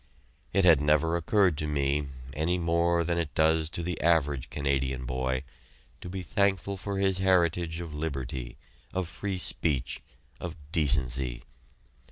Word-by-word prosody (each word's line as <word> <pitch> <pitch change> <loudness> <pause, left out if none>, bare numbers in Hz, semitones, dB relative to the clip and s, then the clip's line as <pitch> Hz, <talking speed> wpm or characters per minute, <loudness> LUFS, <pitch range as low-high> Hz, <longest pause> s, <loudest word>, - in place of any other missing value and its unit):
It 95 0 +3
had 80 -5 +7
never 75 +3 +3
occurred 90 -1 +2
to 75 - -1
me, 70 0 0 0.3
any 80 +6 0
more 85 0 +2
than 85 0 0
it 80 -3 -3
does 80 0 +3
to 85 +1 -4
the 90 -1 -3
average 75 -5 +2
Canadian 65 -2 -1
boy, 65 +1 -1 0.6
to 90 - -7
be 95 0 -5
thankful 100 -1 +1
for 100 +1 -4
his 95 -1 +1
heritage 85 -3 +2
of 85 -3 -7
liberty, 65 -5 -4 0.4
of 95 -2 -1
free 95 +3 -4
speech, 75 -6 0 0.4
of 85 -1 -5 0.2
decency. 65 -5 0
80 Hz, 145 wpm, -28 LUFS, 70-90 Hz, 0.6 s, had